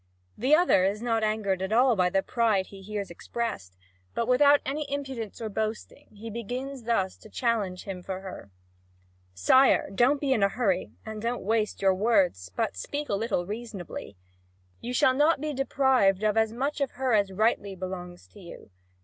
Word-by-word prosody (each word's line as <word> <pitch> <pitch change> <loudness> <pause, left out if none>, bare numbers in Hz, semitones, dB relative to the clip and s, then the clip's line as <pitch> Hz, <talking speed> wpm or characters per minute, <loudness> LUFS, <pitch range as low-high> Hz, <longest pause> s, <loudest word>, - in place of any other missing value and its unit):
The 265 +7 +4
other 330 - +4
is 200 +2 0
not 230 -2 +1
angered 215 -3 0
by 220 - +1
all 250 0 +5
the 190 0 +2
pride 220 -5 +1
he 195 0 -13
hears 200 -1 -5
expressed, 130 - -5 0.4
but 230 - -1
without 285 +3 +5
any 285 +1 -3
impudence 265 -7 -5
or 225 - -3
boasting, 215 +1 -4
he 225 +2 -8
begins 250 +3 -5
thus 195 -5 0
to 215 - -15
challenge 210 -6 -1
him 190 -2 -6
for 190 +1 -5
her: 190 - -9 0.9
"Sire, 230 - +4
don't 255 +8 +3
be 275 -2 +1
in 225 - 0
a 200 - +4
hurry, 195 -5 -1
and 220 -1 -6
don't 235 +2 -2
waste 215 0 -1
your 190 -1 +5
words, 185 - +1
but - - -1
speak 290 - -5
a - - 0
little 200 -3 -1
reasonably. 205 - -7 0.6
You 245 - -5
shall 255 +1 +4
not 295 +3 +3
be 300 +1 -3
deprived 260 -7 +2
of 215 0 +2
as 220 -1 +2
much 275 +5 -2
of 275 - -1
her 260 -1 0
as 200 -2 +2
rightly 200 -1 0
belongs 180 -1 -7
to 210 - -16
you. 170 - -12
220 Hz, 180 wpm, -27 LUFS, 195-250 Hz, 0.9 s, all